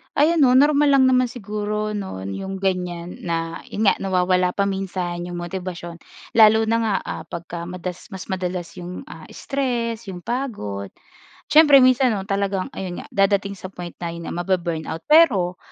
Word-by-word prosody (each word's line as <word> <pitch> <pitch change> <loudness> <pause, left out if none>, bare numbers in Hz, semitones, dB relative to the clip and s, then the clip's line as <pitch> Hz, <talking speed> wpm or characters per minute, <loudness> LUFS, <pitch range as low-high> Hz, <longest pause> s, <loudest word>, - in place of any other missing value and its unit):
Ayan 320 +3 +3
'no, 255 -3 +5
normal 290 +1 +5
lang 270 -1 +6
naman 255 -1 +3
siguro 210 -2 -3
'no 190 - -5
'yong 190 - -5
ganyan 180 -2 -2
na 165 0 -2
'yon 215 - -3
nga, 200 - +4
nawawala 180 -1 +1
pa 200 - +2
minsan 185 -3 -3
'yong 175 - -6
motibasyon, 175 -1 -6 0.4
lalo 220 0 +7
na 230 - +3
nga, 220 -3 0
ah, - - -5
pagka 170 0 -6
madas 180 0 -6
mas 190 - -8
madalas 180 -2 -3
'yong, 180 +6 -7
ah, - - -11
stress, 235 -5 -2
'yong 180 -2 -7
pagod. 155 - -4 0.6
Siyempre 300 -3 +8
minsan 255 -1 +4
'no, 195 - -3
talagang 195 -2 -1
ayun 180 -2 -5
nga - - -13
dadating 200 0 +1
sa 185 0 -9
point 175 -2 -8
na 170 -1 -4
yun 170 0 -7
nga - - -5
mabu-burn 175 -3 -1
out. 160 +1 -5
Pero, 210 - +5
190 Hz, 170 wpm, -22 LUFS, 175-225 Hz, 0.6 s, Siyempre